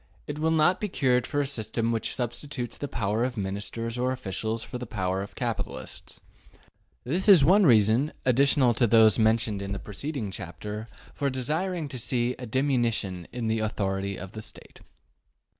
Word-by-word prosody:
It 145 0 -5
will 160 +1 +2
not 160 +3 +3
be 210 - 0
cured 125 -6 +1
by 145 - +1
a - - 0
system 115 -3 -1
which 115 -1 -1
substitutes 125 0 -4
the 145 - -4
power 110 -2 -1
of 125 -1 -2
Ministers 105 +4 -3
or 125 +1 +1
officials 110 -2 -3
for 125 - -6
the 125 - -6
power 95 -3 -1
of 100 - -8
capitalists - - -5 0.8
This 180 +9 0
is 175 -9 +8
one 190 +3 +6
reason, 115 +4 +4
additional 130 0 +4
to 120 +1 +2
those 110 0 +6
mentioned 110 -2 +2
in 100 0 -4
the - - -2
preceding 110 +1 -5
chapter, 105 +5 -6 0.3
for 140 -1 -1
desiring 155 +6 -1
to 130 - -6
see 120 0 0
a 125 - -6
diminution 115 - 0
in 125 -2 -4
the 110 0 +1
authority 100 -2 -2
of 95 0 -8
the 110 - -7
State. - - -12
120 Hz, 175 wpm, -27 LUFS, 105-140 Hz, 0.8 s, is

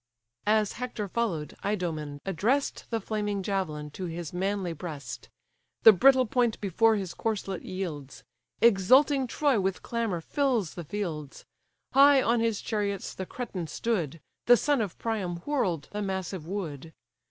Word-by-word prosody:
As 215 -1 +3
Hector 235 -4 -4
follow'd, 190 -8 -2
Idomen 160 -8 -2
address'd 215 - 0
The 230 - -1
flaming 210 -2 -2
javelin 155 -7 -2
to 185 - -6
his 170 -1 -5
manly 190 -1 -1
breast; 145 -7 -7 0.5
The 220 - +11
brittle 260 +6 +5
point 240 -1 +1
before 220 +3 +3
his 190 -4 -3
corslet 200 -4 -3
yields; 160 -8 -6 0.4
Exulting 255 +6 +5
Troy 275 -2 +2
with 190 -1 -1
clamour 230 -7 -1
fills 240 - 0
the 175 - -6
fields: 155 -5 -5 0.5
High 280 +1 +7
on 240 -2 +2
his 225 -2 0
chariots 200 -3 -2
the 185 - -6
Cretan 190 -9 -5
stood, 170 - -2 0.3
The 245 0 +8
son 285 +1 +2
of 200 -6 -4
Priam 205 -6 -2
whirl'd 190 - 0
the 210 - -3
massive 190 -4 -3
wood. 165 -5 -5
200 Hz, 140 wpm, -28 LUFS, 170-230 Hz, 0.5 s, The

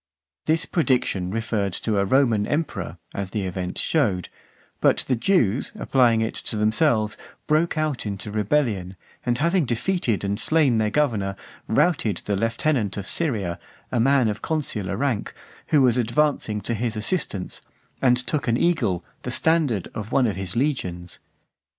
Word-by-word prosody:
This 160 +1 +2
prediction 125 - +1
referred 105 -2 -1
to 105 +1 -1
a 100 - +2
Roman 115 -3 +3
emperor, 140 - -2 0.2
as 100 -1 -4
the 105 0 -2
event 90 0 -4
shewed; 105 - +1 0.5
but - - +3
the 130 - +2
Jews, 125 - +1
applying 120 -4 +3
it 110 - -1 0.2
to - - -4
themselves, 110 0 +2 0.3
broke 155 +2 +1
out 155 -7 -1
into 100 +1 -5
rebellion, 105 -4 0 0.3
and 120 -1 +2
having 170 +4 +2
defeated 120 - 0
and 100 +1 -1
slain 140 -3 +3
their 110 -1 +2
governor, 110 -8 0 0.3
routed 110 - +1
the 100 - 0
lieutenant 115 0 0
of 100 - -4
Syria, 105 - -2 0.3
a 125 - +1
man 135 0 +4
of 105 - -2
consular 110 -12 -2
rank, 130 -4 -1 0.3
who 150 -3 +4
was 125 -1 +4
advancing 120 -3 +1
to 120 - -2
his 115 0 -2
assistance, 105 - -2 0.4
and 125 -2 +4
took 130 +1 0
an 115 0 +2
eagle, 110 - +1 0.2
the - - -5
standard, 155 - +1
of 105 +1 -6
one 135 - +3
of 105 -5 0
his 95 +1 -4
legions. 90 - -2
115 Hz, 155 wpm, -24 LUFS, 100-145 Hz, 0.5 s, man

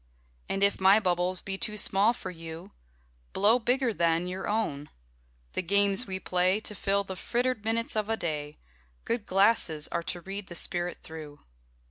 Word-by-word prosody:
And 195 - 0
if 200 -1 +2
my 195 +3 +7
bubbles 180 -2 0
be 195 0 -4
too 210 0 -1
small 200 +2 +4
for 190 -5 -6
you, 165 -1 -9 0.6
Blow 215 +5 +4
bigger 245 +1 +1
then 170 -1 +1
your 185 +1 -4
own: 150 -10 -1 0.6
the - - -1
games 200 +4 +2
we 190 -1 -4
play 185 +2 +1
To 215 - -2
fill 200 0 0
the 190 -1 -6
frittered 245 +2 -1
minutes 225 +1 0
of 215 0 -1
a 225 - +1
day, 150 -4 -4 0.5
Good 230 -3 -2
glasses 190 -6 +3
are 170 - -1
to 175 +1 -3
read 195 +2 -6
the 170 - -8
spirit 175 +1 -1
through. 155 -2 -9
195 Hz, 170 wpm, -28 LUFS, 175-210 Hz, 0.6 s, my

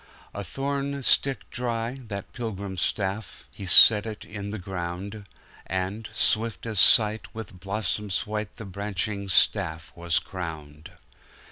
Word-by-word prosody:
A 100 - -5
thorn 140 +7 -3
stick 135 +3 +2
dry, 120 -1 -2
that 100 -2 -7
pilgrim 100 -5 -5
staff, 95 +2 -3
He 100 - -8
set 105 +3 +8
it 110 -1 -7
in 100 -1 -7
the 110 - -4
ground:And, 95 +2 -6
swift 110 -1 0
as 110 -4 -1
sight, 110 0 +6
with 105 -5 -8
blossoms 100 0 -2
white 105 0 -4
The 110 - -9
branching 100 +1 -4
staff 85 -4 +2
was 85 -1 0
crowned! 80 -5 -6
100 Hz, 125 wpm, -26 LUFS, 95-110 Hz, -, set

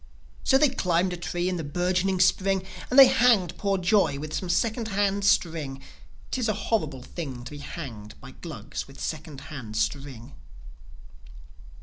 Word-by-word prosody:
So, 265 - +5
they 295 +1 +5
climbed 180 -7 +1
a - - -2
tree 175 0 -2
in 185 -1 -1
the 165 - -4
bourgeoning 180 +5 0
Spring, 190 +1 +2 0.2
And 255 - 0
they 275 - +12
hanged 235 -9 +3
poor 200 -1 +1
Joi 185 -5 +2
with 155 +2 -6
some 185 - -3
second 220 +5 0
hand 200 -1 0
string. 165 -9 +1 0.5
'Tis 245 -4 0
a - - +2
horrible 155 - -2
thing 135 -8 -6
To 125 - -9
be 145 - -8
hanged 115 - -8
by - - -11
Glugs - - -7
with 135 0 -14
second 155 -3 -5
hand 110 -7 -6
string. 135 0 -3
180 Hz, 160 wpm, -26 LUFS, 145-200 Hz, 0.5 s, they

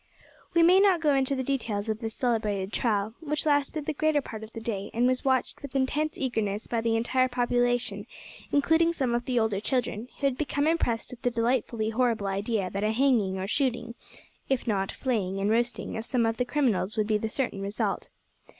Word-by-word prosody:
We 335 - +6
may 360 +3 +7
not 390 -3 +5
go 300 -3 +3
into 270 0 +1
the 260 - -2
details 230 -6 -2
of 220 0 -2
this 225 -2 -5
celebrated 210 -5 -1
trial, 215 -2 0
which 300 -1 -2
lasted 290 0 +1
the 310 - -1
greater 310 0 +2
part 220 -5 -7
of 220 - -10
the - - -5
day, 210 -3 -4
and 240 +2 +3
was 255 0 +1
watched 260 -2 0
with 280 -1 -9
intense 295 +4 0
eagerness 220 -5 -1
by 230 -1 -1
the 225 0 +1
entire 255 +3 +2
population, 245 -4 0 0.4
including 320 +3 +3
some 260 -7 -1
of 240 0 -1
the 250 -2 -1
older 220 -3 +1
children, 240 -1 -1
who 280 - -1
had 270 -2 +1
become 290 -1 0
impressed 275 -8 0
with 250 -1 -10
the 245 - +2
delightfully 235 -2 0
horrible 230 -3 +1
idea 195 0 -1
that 200 +1 -2
a 215 - +2
hanging 225 -7 +2
or 190 - -3
shooting, 240 +1 -1 0.6
if 265 -2 0
not 195 -4 0
flaying 200 -7 -1
and 200 +2 +1
roasting, 240 +1 0
of 220 - -3
some 235 -1 +1
of 225 0 0
the 250 - 0
criminals 240 -7 0
would 215 - +2
be 215 0 +1
the 220 - -2
certain 230 -5 -2
result. 200 +1 -2
240 Hz, 205 wpm, -27 LUFS, 215-270 Hz, 0.6 s, may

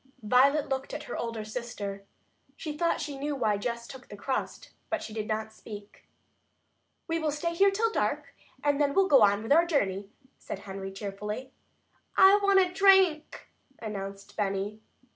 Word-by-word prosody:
Violet 270 +7 +4
looked 270 +1 -3
at 295 - -5
her - - -6
older 230 -2 -4
sister. 215 -4 -6 0.5
She 305 -2 -5
thought 335 +2 +1
she 290 -2 -5
knew 290 +1 -2
why 220 -6 +1
Jess 235 +2 -3
took 260 0 -12
the 205 - -9
crust, 260 +5 -4 0.2
but 330 -1 -2
she 215 - -8
did 215 -1 -4
not 220 0 -3
speak. 205 -2 -11 1.0
"We 330 -1 0
will 315 -1 0
stay 300 +4 -2
here 395 +4 +5
till 440 +3 0
dark, - - -1 0.3
and 290 0 +2
then 280 -1 +1
we'll 390 -1 +4
go 275 -8 +6
on 205 0 +4
with 225 - -5
our 335 +4 +6
journey," 200 - 0 0.3
said - - -6
Henry 195 0 -7
cheerfully. 210 +6 -6 0.7
"I 385 +2 +8
want 395 -1 +5
a 365 -1 +2
drink," 380 -5 +3 0.3
announced 195 -2 -7
Benny. 205 +1 -2
250 Hz, 170 wpm, -28 LUFS, 210-310 Hz, 1.0 s, I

